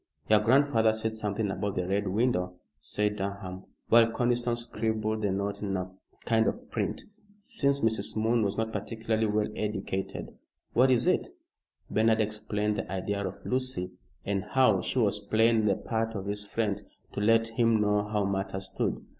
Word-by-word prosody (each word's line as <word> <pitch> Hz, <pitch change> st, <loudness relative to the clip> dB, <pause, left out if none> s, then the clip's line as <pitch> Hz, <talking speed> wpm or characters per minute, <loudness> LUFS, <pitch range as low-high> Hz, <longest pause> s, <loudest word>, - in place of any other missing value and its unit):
"Your 105 Hz, -, +7 dB
grandfather 115 Hz, -1 st, +4 dB
said 110 Hz, 0 st, -2 dB
something 105 Hz, -1 st, -1 dB
about 100 Hz, 0 st, -2 dB
the 90 Hz, -1 st, -1 dB
Red 100 Hz, +1 st, 0 dB
Window," 95 Hz, -3 st, 0 dB, 0.2 s
said 105 Hz, +7 st, -1 dB
Durham, 95 Hz, -1 st, -5 dB, 0.2 s
while 115 Hz, 0 st, +6 dB
Conniston 120 Hz, 0 st, +1 dB
scribbled 110 Hz, -2 st, -1 dB
the 105 Hz, -, +1 dB
note 100 Hz, +1 st, -2 dB
in 100 Hz, -2 st, -1 dB
a 90 Hz, 0 st, -4 dB, 0.3 s
kind 110 Hz, -1 st, +3 dB
of -, -, -4 dB
print, -, -, -2 dB, 0.3 s
since 180 Hz, -, 0 dB
Mrs. 110 Hz, 0 st, 0 dB
Moon 115 Hz, +2 st, +2 dB
was 100 Hz, -1 st, 0 dB
not 110 Hz, 0 st, -1 dB
particularly 110 Hz, +1 st, -1 dB
well 105 Hz, 0 st, +1 dB
educated. 95 Hz, -2 st, -3 dB, 0.4 s
"What 130 Hz, +3 st, +5 dB
is 125 Hz, -2 st, +3 dB
it?" 185 Hz, -, +2 dB, 0.6 s
Bernard 110 Hz, 0 st, +3 dB
explained 105 Hz, 0 st, -1 dB
the -, -, -4 dB
idea 100 Hz, +2 st, -2 dB
of 95 Hz, -, -6 dB
Lucy, 130 Hz, -8 st, -1 dB, 0.3 s
and 100 Hz, -1 st, -1 dB
how 120 Hz, -8 st, +3 dB
she -, -, -3 dB
was 105 Hz, -4 st, +2 dB
playing 110 Hz, +1 st, +3 dB
the 100 Hz, -, +3 dB
part 115 Hz, +1 st, -2 dB
of 100 Hz, -1 st, -4 dB
his 105 Hz, 0 st, -3 dB
friend, 105 Hz, -2 st, -1 dB, 0.3 s
to -, -, -3 dB
let 115 Hz, +1 st, +4 dB
him 115 Hz, -1 st, +2 dB
know 105 Hz, 0 st, +2 dB
how 105 Hz, -1 st, 0 dB
matters 95 Hz, -1 st, -2 dB
stood. -, -, -2 dB
110 Hz, 170 wpm, -29 LUFS, 100-115 Hz, 0.6 s, Your